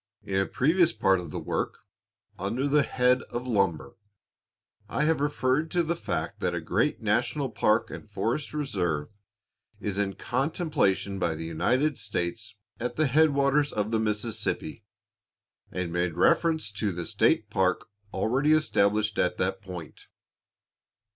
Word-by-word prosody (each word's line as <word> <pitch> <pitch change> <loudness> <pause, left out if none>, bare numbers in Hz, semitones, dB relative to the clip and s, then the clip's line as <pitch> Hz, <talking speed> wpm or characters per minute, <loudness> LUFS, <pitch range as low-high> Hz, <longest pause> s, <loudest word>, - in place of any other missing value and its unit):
In 95 - -2
a 95 - +1
previous 160 - +3
part 95 -1 +3
of 85 -2 -7
this - - -5
work, - - -2 0.6
under 115 +9 -1
the 145 +1 +4
head 125 -1 +2
of 120 +1 -4
"Lumber," 95 - 0 1.0
I 140 - 0
have 155 -1 +2
referred 145 +2 +1
to 175 +1 +1
the 170 +1 -1
fact - - -3
that - - -1
a - - -1
great - - 0
national 140 -4 0
park 110 +2 +2
and 105 - -9
forest 120 +7 -2
reserve 95 - -2 0.7
is 100 -1 -3
in 95 -2 -1
contemplation 130 - 0
by 85 -3 0
the 80 +1 -5
United 130 - +1
States 100 0 -4 0.2
at 120 +1 -3
the 155 - +2
headwaters 145 0 +3
of 105 +1 -2
the 110 - +2
Mississippi, 110 +5 -2 0.9
and 90 -2 -3
made 85 -1 0
reference 160 - +2
to 105 0 -2
the 85 -1 -5
state - - +2
park 95 -1 +1 0.2
already 135 +7 +2
established 110 -8 +2
at 90 - +1
that 95 +1 -1
point. 90 -5 -9
110 Hz, 145 wpm, -27 LUFS, 95-140 Hz, 1.0 s, the